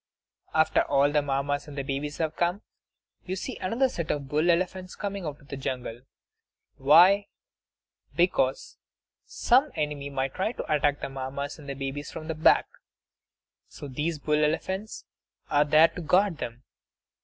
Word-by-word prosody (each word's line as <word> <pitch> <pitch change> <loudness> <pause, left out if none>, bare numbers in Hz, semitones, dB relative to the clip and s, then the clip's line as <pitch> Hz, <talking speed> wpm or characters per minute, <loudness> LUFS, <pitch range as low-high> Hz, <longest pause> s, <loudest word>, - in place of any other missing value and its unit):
After 160 0 +4
all 140 +1 +2
the 150 0 +3
Mammas 145 +1 -1
and 145 - -9
babies 140 +1 -3
have 160 -1 -2
come, 175 +4 0 0.6
you 185 - -4
see 240 +6 -5
another 230 +8 +1
set 170 -10 -5
of 140 -2 -2
bull 150 +5 +1
elephants 185 +1 0
coming 200 -3 -4
out 145 -1 -6
of 140 - -21
the - - -4
jungle. 125 -3 -4 0.8
Why? 180 +9 +6 0.9
Because - - +1 0.5
some 265 +5 +3
enemy 150 -2 -3
might 135 -1 -2
try 205 +5 -1
to 155 - -3
attack 145 -1 +1
the - - -2
Mammas 135 +2 -5
and 145 -2 -10
the 140 - -4
babies 135 +2 -5
from 155 -1 -8
the - - 0
back; 155 0 +4 1.0
so 145 - -9
these 150 +5 -2
bull 150 +1 +1
elephants 190 +7 -2 0.5
are 145 0 +4
there 155 +2 +6
to 175 - -8
guard 180 +2 +2
them. 120 +2 -6
150 Hz, 155 wpm, -27 LUFS, 140-180 Hz, 1.0 s, Why